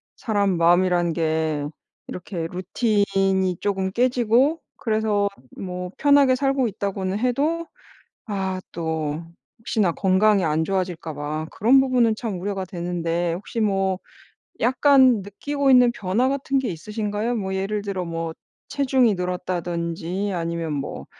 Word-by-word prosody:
사람 200 Hz, -5 st, 0 dB
마음이란 175 Hz, 0 st, +3 dB
게 160 Hz, -2 st, 0 dB, 0.4 s
이렇게 180 Hz, -2 st, -5 dB
루틴이 195 Hz, -1 st, +1 dB
쪼금 195 Hz, -2 st, -1 dB
깨지고 250 Hz, -, +2 dB, 0.2 s
그래서 215 Hz, -2 st, +1 dB, 0.3 s
뭐 180 Hz, -1 st, -5 dB
편하게 285 Hz, -2 st, +5 dB
살고 270 Hz, -1 st, +1 dB
있다고는 195 Hz, -2 st, -3 dB
해도 290 Hz, +8 st, 0 dB, 0.6 s
아 190 Hz, -3 st, -2 dB
또 160 Hz, -1 st, -3 dB, 0.4 s
혹시나 215 Hz, -5 st, +1 dB
건강이 190 Hz, +2 st, +3 dB
안 155 Hz, +1 st, +1 dB
좋아질까 180 Hz, -3 st, -2 dB
봐 150 Hz, +2 st, -3 dB
그런 245 Hz, +6 st, +4 dB
부분은 250 Hz, -4 st, +3 dB
참 215 Hz, -5 st, -4 dB
우려가 195 Hz, +1 st, -3 dB
되는데 175 Hz, -2 st, -2 dB
혹시 200 Hz, +6 st, -5 dB
뭐 195 Hz, -3 st, +1 dB, 0.6 s
약간 260 Hz, -2 st, +5 dB
느끼고 275 Hz, +8 st, -1 dB
있는 250 Hz, -2 st, +7 dB
변화 225 Hz, +3 st, 0 dB
같은 275 Hz, 0 st, 0 dB
게 265 Hz, -, -1 dB
있으신가요? 210 Hz, +6 st, -3 dB
뭐 190 Hz, -4 st, -2 dB
예를 200 Hz, +2 st, -2 dB
들어 195 Hz, -3 st, -3 dB
뭐 165 Hz, -1 st, -3 dB, 0.4 s
체중이 260 Hz, -5 st, +2 dB
늘었다든지 180 Hz, +1 st, -3 dB
아니면 165 Hz, -2 st, -2 dB
뭐 140 Hz, -2 st, -5 dB
195 Hz, 275 characters per minute, -23 LUFS, 175-230 Hz, 0.6 s, 있는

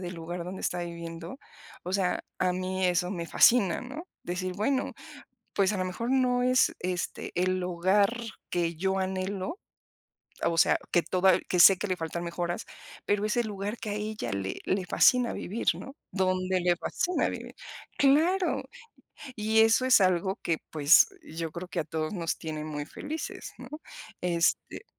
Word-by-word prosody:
del 180 Hz, -1 st, -5 dB
lugar 170 Hz, +1 st, -5 dB
donde 185 Hz, +2 st, -7 dB
está 175 Hz, 0 st, -1 dB
viviendo, 170 Hz, +4 st, -7 dB, 0.4 s
o 180 Hz, -, -5 dB
sea, 190 Hz, -2 st, 0 dB
a 185 Hz, -1 st, +2 dB
mí 185 Hz, 0 st, -1 dB
eso 180 Hz, 0 st, +1 dB
me 170 Hz, -3 st, -4 dB
fascina, 195 Hz, -2 st, +4 dB
¿no?, 295 Hz, +8 st, -8 dB
decir: 180 Hz, +1 st, -3 dB
"Bueno, 260 Hz, +7 st, 0 dB, 0.6 s
pues, 195 Hz, +1 st, +2 dB
a 205 Hz, -, -2 dB
lo 185 Hz, -, -1 dB
mejor, 230 Hz, +7 st, -3 dB
no 250 Hz, -2 st, +2 dB
es, 255 Hz, 0 st, +3 dB
este, 180 Hz, -1 st, -3 dB
el 185 Hz, +1 st, +1 dB
hogar 185 Hz, +5 st, +2 dB, 0.4 s
que 170 Hz, -1 st, 0 dB
yo 190 Hz, +3 st, -1 dB
anhelo, 190 Hz, -, -3 dB, 0.8 s
o 170 Hz, -, +1 dB
sea -, -, +5 dB
que 175 Hz, -, +3 dB
toda 185 Hz, +2 st, +3 dB
que 180 Hz, -, +1 dB
sé 195 Hz, +2 st, +9 dB
que 205 Hz, -, -3 dB
le 185 Hz, -2 st, -1 dB
faltan 170 Hz, +1 st, -4 dB
mejoras, 175 Hz, 0 st, -3 dB, 0.4 s
pero 205 Hz, 0 st, +1 dB
es 215 Hz, -, -1 dB
el 240 Hz, -2 st, +1 dB
lugar 205 Hz, +1 st, -4 dB
que 215 Hz, -, -5 dB
a -, -, -1 dB
ella 215 Hz, +1 st, -4 dB
le 95 Hz, -1 st, -3 dB
le 190 Hz, -1 st, -1 dB
fascina 250 Hz, -2 st, +4 dB
vivir, 215 Hz, +6 st, -5 dB
¿no?, 270 Hz, -, -9 dB, 0.2 s
dónde 185 Hz, -1 st, +1 dB
le 175 Hz, 0 st, +2 dB
fascina 355 Hz, -, -1 dB
vivir". -, -, -7 dB, 0.4 s
Claro, 325 Hz, +7 st, +3 dB, 0.7 s
y 220 Hz, +1 st, +3 dB
eso 225 Hz, +3 st, +4 dB
es 255 Hz, -3 st, +6 dB
algo 190 Hz, +1 st, +2 dB
que, 165 Hz, -2 st, 0 dB
pues, 150 Hz, 0 st, +6 dB, 0.2 s
yo 165 Hz, 0 st, -5 dB
creo 175 Hz, +2 st, -7 dB
que -, -, -3 dB
a -, -, 0 dB
todos 155 Hz, +2 st, -3 dB
nos 170 Hz, -4 st, -2 dB
tienen 155 Hz, -2 st, -5 dB
muy 150 Hz, -1 st, -4 dB
felices, 310 Hz, -, -6 dB
¿no? -, -, -10 dB, 0.5 s
Este, 170 Hz, -2 st, 0 dB
185 Hz, 170 wpm, -28 LUFS, 175-210 Hz, 0.8 s, sé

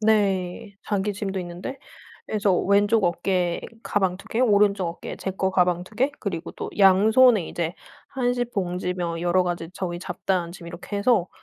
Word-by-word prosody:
네. 200 Hz, -3 st, +1 dB
자기 205 Hz, 0 st, -1 dB
짐도 195 Hz, -1 st, -3 dB
있는데. 175 Hz, +9 st, -6 dB, 0.5 s
그래서 205 Hz, -4 st, +2 dB
왼쪽 205 Hz, +1 st, +3 dB
어깨에 175 Hz, 0 st, 0 dB, 0.2 s
가방 190 Hz, -3 st, 0 dB
2 200 Hz, -, -14 dB
개 230 Hz, -, -1 dB
오른쪽 205 Hz, -5 st, +3 dB
어깨에 170 Hz, -, -7 dB
제 190 Hz, -, -3 dB
거 190 Hz, 0 st, -1 dB
가방 180 Hz, -1 st, +2 dB
2 215 Hz, -, -16 dB
개 265 Hz, +6 st, +2 dB
그리고 175 Hz, -5 st, -4 dB
또 -, -, -6 dB
양손에 210 Hz, +2 st, +5 dB
이제 170 Hz, +1 st, -3 dB, 0.3 s
한식 245 Hz, -2 st, -1 dB
봉지며 180 Hz, -3 st, -2 dB
여러 175 Hz, +1 st, +3 dB
가지 175 Hz, -2 st, -3 dB
저의 175 Hz, -2 st, -4 dB
잡다한 180 Hz, -1 st, -2 dB
짐 175 Hz, -2 st, -11 dB
이렇게 185 Hz, +4 st, -6 dB
해서 200 Hz, -4 st, +2 dB
190 Hz, 310 characters per minute, -24 LUFS, 175-210 Hz, 0.5 s, 양손에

